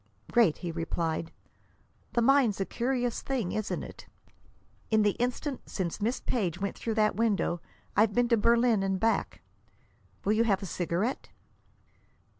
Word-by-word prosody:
"Great," 225 -10 +4
he 175 -2 -4
replied. 165 0 -2 0.8
"The 235 - +2
mind's 260 -6 +4
a 195 - 0
curious 245 0 -1
thing, 245 -9 -2
isn't 215 -1 -2
it. - - -11 0.8
In 220 -1 +4
the 205 - +4
instant 255 +3 -2
since 185 +1 -3
Miss 230 +5 0
Page 180 -9 -1
went 200 0 -2
through 225 -2 -3
that 215 -1 +2
window 205 -6 +1 0.3
I've 210 0 +3
been 245 0 +3
to 235 - +4
Berlin 235 -1 +3
and 195 -1 0
back! 225 0 0 0.8
Will 205 - +3
you 220 +1 +3
have 200 -3 +1
a - - -3
cigarette?" 180 +7 -2
215 Hz, 150 wpm, -29 LUFS, 190-235 Hz, 0.8 s, Great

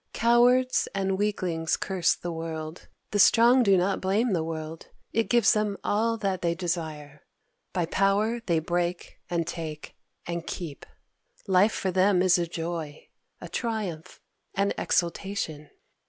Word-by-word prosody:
Cowards 245 +2 +3
and 195 -1 0
weaklings 185 -5 -1
curse 185 -3 +1
the 175 - -5
world. 160 0 -6 0.2
The 205 - 0
strong 240 +5 +6
do 200 -5 +4
not 190 +2 0
blame 205 +4 +1
the 165 -3 0
world: 160 0 -6 0.3
it 225 0 +1
gives 240 -3 +5
them 210 -2 0
all 230 +2 +1
that 195 -4 -2
they 170 -1 0
desire. 160 -5 -4 0.5
By 180 -3 0
power 200 +6 +1
they 170 -6 +1
break 175 +2 -2
and 170 -1 0
take 160 -3 -6 0.3
and 170 -1 -4
keep. 160 -6 -6 0.6
Life 195 +2 +4
for 190 - -1
them 185 0 +3
is 185 -1 +4
a 170 - -1
joy, 165 -3 -5 0.3
a - - -8
triumph, 210 -9 -4 0.4
an 200 0 +1
exultation. 170 -4 -2
180 Hz, 140 wpm, -27 LUFS, 165-205 Hz, 0.6 s, strong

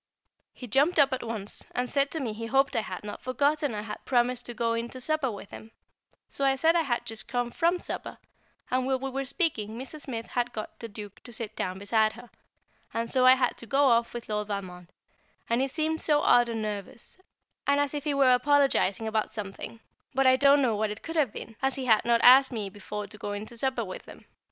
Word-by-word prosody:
He 250 - -10
jumped 280 +9 +2
up 280 -2 +5
at 260 - -2
once, 220 -3 -1
and 250 0 0
said 280 +2 +1
to 320 - -2
me 240 -6 -3
he 230 +1 -6
hoped 270 +2 +2
I 225 - +2
had 190 -3 -7
not 210 - -7
forgotten 285 0 0
I 210 - -4
had 215 - -7
promised 245 -1 +1
to 240 - -7
go 230 0 0
in 230 +1 -3
to 255 - -9
supper 310 0 0
with 200 -2 -8
him, 220 - -10 0.6
so 275 - -4
I 270 0 +4
said 320 +5 +3
I 340 - +4
had 245 -6 -2
just 225 -1 -4
come 245 -1 -2
from 340 +5 +2
supper; - - -6 0.5
and 255 0 +1
while 265 -1 +1
we 270 +1 -5
were 270 +1 -3
speaking 260 - -1
Mrs. 270 +4 -7
Smith 230 -5 -5
had 245 0 -2
got 215 -2 -7
the 230 - -6
Duke 205 -2 -10
to 240 - -11
sit 225 -2 -5
down 185 0 -3
beside 215 +2 +1
her, 240 +1 -13 0.6
and 230 0 -2
so 255 -1 +4
I 255 - +9
had 255 -1 0
to 235 - -7
go 275 +3 +3
off 235 0 +2
with 235 - -6
Lord 210 -1 -2
Valmond, 185 -4 -6 0.6
and 235 +2 +1
he 270 - +1
seemed 315 +3 -1
so 300 -1 +3
odd 240 -4 +4
and 225 -1 -3
nervous, 210 - -6 0.5
and 280 0 +3
as 285 -1 0
if 290 -2 -3
he 295 -2 -1
were 265 -2 +5
apologising 250 -6 +2
about 220 -1 -1
something; 210 +2 -7 0.3
but 270 0 +3
I 260 0 +7
don't 280 +1 +5
know 235 -4 +2
what 215 +1 0
it 210 +1 -7
could 330 - -6
have 290 -8 +2
been, 225 - -9
as 270 0 +1
he 265 - -4
had 220 -3 +4
not 235 -1 +3
asked 260 +2 +8
me 210 -5 -4
before 210 +1 -6
to 205 +2 -12
go 205 - -4
in 205 +1 -5
to 235 - -10
supper 250 -1 -1
with 185 - -9
him. - - -13
245 Hz, 240 wpm, -28 LUFS, 220-275 Hz, 0.6 s, I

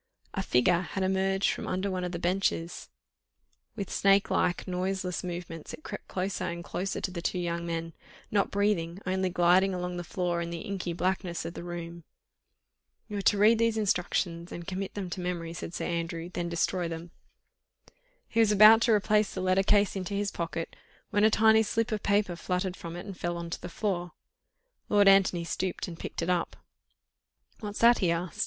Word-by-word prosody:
A 195 - -1
figure 170 +2 +3
had 190 +1 -3
emerged 190 +1 +1
from - - -5
under 190 +2 -1
one 185 -1 -2
of 180 - -3
the 175 - -3
benches; 175 -1 -1 0.9
with 200 - -5
snake 195 0 +3
like, 175 - +1
noiseless 185 0 -2
movements 175 -3 -6
it 310 - -23
crept - - -7
closer 190 +1 -2
and 170 0 -4
closer 190 +3 -3
to 185 - -3
the 175 -2 -5
two 180 - -1
young 170 -1 -2
men, 165 0 -3 0.4
not 200 -1 +2
breathing, 195 -4 0
only 185 0 0
gliding 180 +2 +3
along 180 0 -3
the 175 - -4
floor, 175 0 -1
in 170 - -3
the 170 -1 -5
inky 190 -3 -4
blackness 180 0 -1
of 170 - -5
the - - -7
room. 170 -1 -7 1.1
"You 210 - -4
are 195 - 0
to 205 - -1
read 220 +3 +5
these 230 -1 +2
instructions 175 -4 0
and 170 - -7
commit 190 +1 -4
them 190 -3 -4
to 185 - -4
memory," 170 -2 -3
said 170 +1 -6
Sir - - -3
Andrew, 170 0 -3
"then 175 -1 -2
destroy 170 +1 0
them." 165 +1 -7 1.2
He 230 - -1
was 220 -2 +5
about 215 +2 +8
to 235 - +3
replace 210 0 +2
the - - -5
letter 185 +1 +3
case 205 +1 +3
into 195 +1 -3
his 200 0 -1
pocket, 165 -1 -4 0.4
when 205 -1 +2
a 215 - +7
tiny 220 0 +5
slip 225 +1 0
of 215 -1 -1
paper 200 -3 +1
fluttered 180 +1 -2
from 170 -2 -8
it 175 - -7
and 200 -2 -7
fell 175 0 -3
on 170 0 -6
to - - -4
the 175 - -6
floor. 175 -3 -2 0.8
Lord 205 -1 +5
Antony 195 -3 +5
stooped 185 +3 -3
and 170 -2 -8
picked - - -4
it 170 - -2
up. 175 -1 -1 1.0
"What's 210 -1 -5
that?" 235 +1 +6
he 180 - +2
asked. 170 +1 -2
180 Hz, 195 wpm, -29 LUFS, 170-200 Hz, 1.2 s, about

